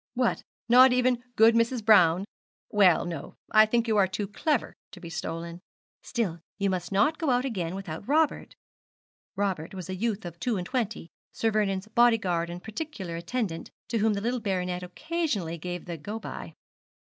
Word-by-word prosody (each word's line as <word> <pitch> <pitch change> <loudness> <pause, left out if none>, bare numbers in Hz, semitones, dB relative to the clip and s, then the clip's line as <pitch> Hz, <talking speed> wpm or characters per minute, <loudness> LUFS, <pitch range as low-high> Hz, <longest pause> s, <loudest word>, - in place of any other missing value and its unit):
'What, 250 -1 +1 0.3
not 250 +2 +8
even 250 -1 +2
good 225 +1 +6
Mrs. 230 0 +1
Brown? 185 -4 +5 0.5
Well, 195 -5 +5
no; 165 -5 -6 0.2
I 215 0 +7
think 235 +1 +1
you 220 -2 +2
are 195 -2 +5
too 200 +2 -3
clever 250 +7 -1 0.2
to 185 - -10
be 170 -2 -9
stolen. 170 +1 -5 0.4
Still 205 -9 -2 0.2
you 200 -1 +1
must 180 -1 -3
not 210 +11 +2
go 320 -4 0
out 250 +1 +2
again 185 -9 -3
without 190 -1 -7
Robert.' 310 +2 +1 0.8
(Robert 190 -4 -2
was 185 0 -6
a - - -3
youth 215 0 -2
of 170 -1 -8
two 235 0 0
and 180 - -3
twenty, 220 -7 -3 0.2
Sir 225 - 0
Vernon's 200 -2 0
body 235 +1 +4
guard 170 -4 -1
and 175 +1 -7
particular 220 - -5
attendant, 170 0 -3 0.2
to 230 - 0
whom 215 +1 +3
the 200 - -3
little 245 +3 -1
baronet 180 -3 -2
occasionally 190 - -3
gave 175 +1 -5
the 170 -2 -5
go 205 +9 -6
by.) - - -8
205 Hz, 180 wpm, -27 LUFS, 180-235 Hz, 0.8 s, not